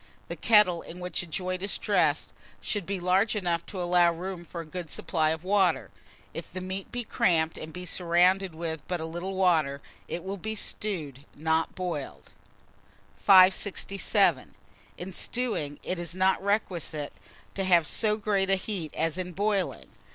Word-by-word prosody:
The - - -3
kettle 210 -7 +4
in 175 - -10
which 180 0 -2
a 175 - -8
joint 185 +2 -3
is 195 +1 -1
dressed - - +1 0.3
should 205 -5 -3
be 195 -1 -2
large 190 +5 +2
enough 175 -4 0
to 195 - -6
allow 175 -1 +4
room 175 +1 -6
for 170 0 -8
a - - -9
good 170 +1 -7
supply 155 0 0
of 160 +1 -2
water; 195 0 +2 0.4
if - - -7
the 185 - -5
meat 185 +1 -5
be 245 0 -2
cramped 165 -6 +1
and 155 - -7
be 180 +2 -7
surrounded 180 +1 +2
with 160 -2 -4
but 180 -1 -2
little 175 +4 -5
water, 160 -7 +2 0.3
it 170 - -5
will 195 +1 -4
be 220 +3 -4
stewed, 160 -11 -3
not 160 +1 0
boiled. 145 - -5 0.9
567. 195 +1 +4 0.4
IN 180 +2 -6
STEWING, 210 - -2
IT 185 - -3
IS 170 0 -2
NOT 190 +1 +2
REQUISITE 175 -7 -1 0.4
to 195 - -2
have 175 -3 +4
so 210 +6 +2
great 200 -3 0
a 195 - +6
heat 185 -5 -3
as 165 +2 0
in 180 -1 -4
boiling. 200 0 -1
180 Hz, 165 wpm, -28 LUFS, 165-195 Hz, 0.9 s, a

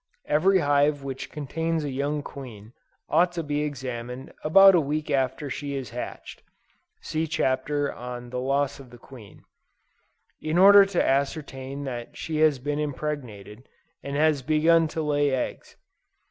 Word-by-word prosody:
Every 185 +6 +3
hive 145 -2 +2
which 135 -1 -6
contains 160 +2 -2
a 145 - -3
young 145 +2 -2
queen, 120 -6 -10 0.3
ought 175 +1 +3
to 170 -1 -3
be 145 0 -2
examined 130 -3 -5
about 195 +5 +7
a 175 - +4
week 150 +1 -3
after 135 +1 0
she 140 +1 -4
has 130 -6 -5
hatched, - - -7 0.6
(see 160 +1 -2
Chapter 145 0 -1
on 125 0 -8
Loss 135 +2 -1
of 135 -2 -13
the 120 - -14
Queen,) 120 -4 -15 1.0
in 155 +2 -1
order 200 +2 +8
to 195 -3 0
ascertain 140 -1 -2
that 120 -3 -6
she 160 -1 -4
has 155 -2 +4
been 145 +3 -3
impregnated, 130 -7 -5 0.3
and 140 0 -5
has 150 -1 +2
begun 160 +3 +3
to 160 +1 -4
lay 145 -1 +1
eggs. 130 -2 -4
145 Hz, 145 wpm, -25 LUFS, 130-155 Hz, 1.0 s, order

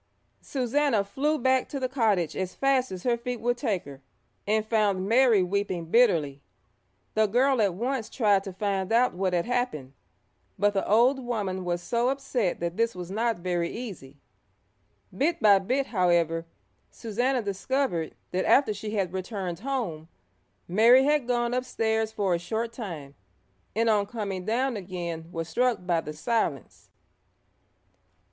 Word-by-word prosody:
Susannah 260 -3 +1
flew 285 +10 -1
back 260 0 +1
to 275 - -4
the 260 - -1
cottage 220 - +1
as 185 -1 -3
fast 270 -3 +1
as 185 -1 -6
her 240 -1 +2
feet 240 0 -5
would 245 +2 0
take 225 -7 -2
her, 140 -1 -11 0.5
and 215 +1 +1
found 205 -4 +1
Mary 230 -3 +5
weeping 185 -2 -2
bitterly. 165 - +2 0.7
The 215 0 +3
girl 255 +3 +2
at 195 -4 +1
once 240 +2 -2
tried 205 -5 +2
to 195 - -6
find 195 0 -2
out 240 +2 +3
what 185 0 -1
had 175 -1 +1
happened, 245 - -2 0.6
but 205 +1 +2
the 195 - -1
old 245 +6 +4
woman 200 -6 -3
was 175 -1 -2
so 240 +3 +1
upset 255 -7 -1
that 170 +1 -3
this 230 -1 +1
was 180 0 -7
not 230 +3 0
very 175 -1 -1
easy. 185 - -8 1.0
Bit 325 +5 +1
by 205 -4 +6
bit, 255 +8 0
however, 170 -5 +1 0.4
Susannah 245 +3 -1
discovered 200 - -2 0.2
that 185 +1 0
after 265 -6 +4
she 210 +1 -5
had 190 -3 -1
returned 185 -2 -4
home, 220 - -3 0.6
Mary 230 +8 +6
had 295 -3 +2
gone 240 -1 0
upstairs 220 -3 -1
for 200 -4 0
a 170 - 0
short 225 +6 -3
time, 165 - -7 0.6
and 230 +1 +2
on 210 -2 +2
coming 200 -5 -4
down 240 +3 0
again 175 -3 -6
was 165 -1 -4
struck 240 +2 0
by 170 -2 +1
the 150 - -7
silence. 160 - -2
215 Hz, 155 wpm, -27 LUFS, 180-245 Hz, 1.0 s, by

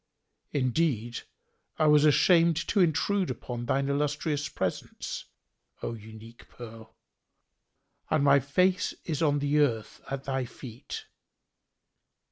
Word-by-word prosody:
Indeed, 125 -3 0 0.6
I 155 - +2
was 150 0 +6
ashamed 165 +2 +5
to 210 - +2
intrude 185 +3 +2
upon 120 -1 -5
thine 135 +2 +1
illustrious 145 +1 -1
presence, 95 -1 -4 0.6
O - - -2
unique 110 +1 -12
pearl, 115 -1 -11 1.1
and 140 - +2
my 140 0 +6
face 180 +8 +1
is 155 -3 -2
on 145 -3 +3
the 145 +1 +1
earth 115 -7 0
at 135 0 -4
thy 135 -2 -2
feet." 120 0 -9
140 Hz, 110 wpm, -28 LUFS, 120-155 Hz, 1.1 s, was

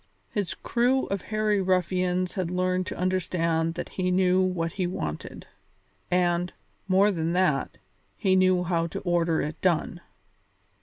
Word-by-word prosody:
His 205 -4 -2
crew 250 +2 +1
of 195 -1 -2
hairy 215 -1 0
ruffians 185 0 0
had 185 -4 -2
learned 185 0 0
to - - -5
understand 170 -3 0
that 175 - -5
he 185 -1 -2
knew 185 0 +3
what 180 -3 0
he 185 0 -2
wanted, 80 - -5 0.6
and, 175 0 +1 0.4
more 195 +2 +4
than 165 -2 -1
that, 175 -7 +1 0.4
he 190 -4 +2
knew 185 -1 +4
how 170 -1 0
to - - -5
order 170 -2 +1
it 150 +2 -5
done. 175 -1 0
180 Hz, 145 wpm, -26 LUFS, 170-185 Hz, 0.6 s, more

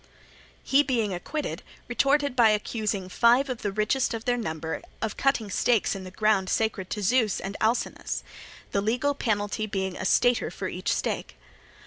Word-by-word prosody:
He, 275 +2 +4
being 235 -8 0
acquitted, 290 - -4 0.3
retorted 280 +2 +2
by 235 -3 +6
accusing 210 -2 -1
five 240 +8 +4
of 245 - -4
the 205 - -1
richest 215 +5 +1
of 225 - -7
their 245 - +2
number 160 -8 -4 0.2
of 220 - -3
cutting 250 -7 +1
stakes 230 +2 +2
in 190 -1 -6
the - - -7
ground 195 -1 +1
sacred 215 -4 0
to 210 - -3
Zeus 225 0 +2
and 195 +1 -5
Alcinous; 225 +3 -1 0.5
the 200 - +1
legal 245 +7 +1
penalty 215 -4 -1
being 190 -2 -2
a 190 - -5
stater 245 +4 +3
for - - -5
each - - -2
stake. - - -2
220 Hz, 165 wpm, -26 LUFS, 200-245 Hz, 0.5 s, by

